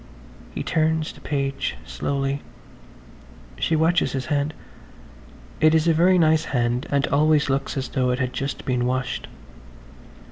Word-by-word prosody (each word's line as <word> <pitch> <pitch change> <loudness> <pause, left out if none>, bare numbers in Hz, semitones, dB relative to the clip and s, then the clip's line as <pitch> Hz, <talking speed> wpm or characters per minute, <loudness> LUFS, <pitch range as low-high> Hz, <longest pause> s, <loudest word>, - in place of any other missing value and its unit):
He - - -3
turns 160 -1 0
the - - -16
page 140 -1 -2
slowly. 140 0 -2 1.2
She 165 - +1
watches 165 +2 +2
his 130 -2 -2
hand–it 145 - -3
is 160 +1 +2
a 165 - +5
very 180 +3 +4
nice 160 -2 +3
hand 120 0 -1
and 140 -1 +2
always 150 0 +3
looks 135 +1 -1
as 135 - -2
though 130 -2 0
it 125 - +1
had 130 -1 -2
just 135 -1 -4
been 125 -2 0
washed. 130 -2 -2
140 Hz, 140 wpm, -23 LUFS, 130-155 Hz, 1.2 s, a